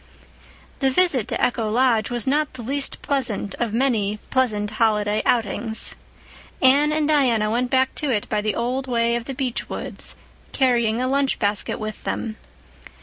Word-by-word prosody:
The 270 - +3
visit 270 - +2
to - - -2
Echo 230 -3 +1
Lodge 230 -2 +2
was 240 -3 -2
not 295 +3 +1
the 245 - -7
least 275 +4 -1
pleasant 235 -8 -1
of 235 -3 -1
many 220 -4 +1
pleasant 215 -6 +1
holiday 210 -1 +2
outings. 225 -1 0 0.7
Anne 280 +3 +5
and 305 -1 +1
Diana 245 -8 +2
went 245 +2 0
back 260 0 +2
to 300 - -1
it 215 -5 0
by 210 -1 0
the 210 -1 -1
old 255 +3 -2
way 235 -1 +1
of 235 -1 -3
the 270 - -5
beech 255 -3 -3
woods, - - -5 0.4
carrying 235 -4 +2
a 255 - 0
lunch 275 0 +1
basket 205 -1 0
with 215 0 -6
them. 220 -1 -3
240 Hz, 165 wpm, -22 LUFS, 215-265 Hz, 0.7 s, Anne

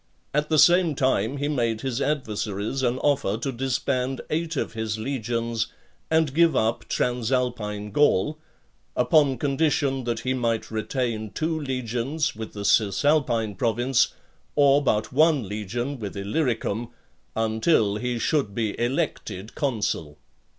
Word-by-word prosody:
At 150 +1 0
the 155 - +3
same 175 0 +5
time, 130 -1 +1
he 145 +1 -1
made 115 -6 0
his 130 0 -2
adversaries 110 -4 -2
an 125 -1 +1
offer 140 -8 +1
to 130 +4 -3
disband 130 +1 -1
eight 165 +1 -1
of - - -2
his 110 -1 -2
legions 115 -1 -2 0.4
and 160 -3 +2
give 165 +1 +4
up 110 +1 +1
Transalpine 120 -4 -1
Gaul, 145 +2 +2 0.6
upon 135 +2 +3
condition 140 -1 +1
that 120 -2 -2
he 130 - 0
might 115 -4 -1
retain 110 0 -2
two 160 +9 -2
legions, 130 +2 -2
with 110 0 -7
the 100 -1 -5
Cisalpine 115 +2 +2
province, 120 +5 +1 0.4
or 145 -1 +5
but 110 -2 0
one 150 - +3
legion 120 +7 -4
with 100 -2 -6
Illyricum, 115 0 -1 0.5
until 110 -1 +2
he 125 +1 -2
should 115 -5 0
be 110 -3 -1
elected 120 - -2
consul. 105 - -2
125 Hz, 130 wpm, -25 LUFS, 110-140 Hz, 0.6 s, same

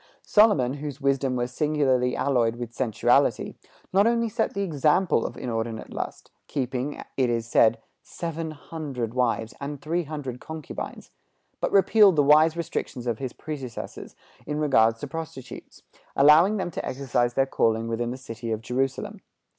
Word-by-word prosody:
Solomon, 205 - +4
whose 145 -1 -6
wisdom 135 -1 +1
was 120 0 -2
singularly 130 -4 +1
alloyed 120 -5 +1
with 120 -1 -6
sensuality, 120 0 +2 0.4
not 200 +3 +5
only 235 -1 +1
set 225 -1 -1
the 200 - 0
example 160 -3 +2
of - - -10
inordinate 115 -2 -4
lust, - - -6 0.2
keeping, 130 +1 -3
it 130 -2 +2
is 115 -1 -1
said, 115 -1 +4 0.2
seven 165 -1 -5
hundred 145 -6 -5
wives 115 -3 0
and 140 0 -5
three 165 +4 -2
hundred 140 -5 -6
concubines, 160 -2 -7 0.5
but - - -1
repealed 200 -1 +6
the 145 - +4
wise 155 +3 +5
restrictions 140 -6 -4
of 115 -3 -2
his 130 -2 -4
predecessors 135 -6 -7 0.3
in 150 0 -2
regard 115 -7 +3
to 115 - -7
prostitutes, 150 -4 -8 0.3
allowing 155 +9 +6
them 185 -3 -3
to - - -5
exercise 125 -2 -1
their 135 - +3
calling 115 -3 +1
within 115 +1 -2
the 125 - -5
city 115 -3 -7
of 110 - -1
Jerusalem. 130 +3 -2
135 Hz, 155 wpm, -25 LUFS, 120-155 Hz, 0.5 s, repealed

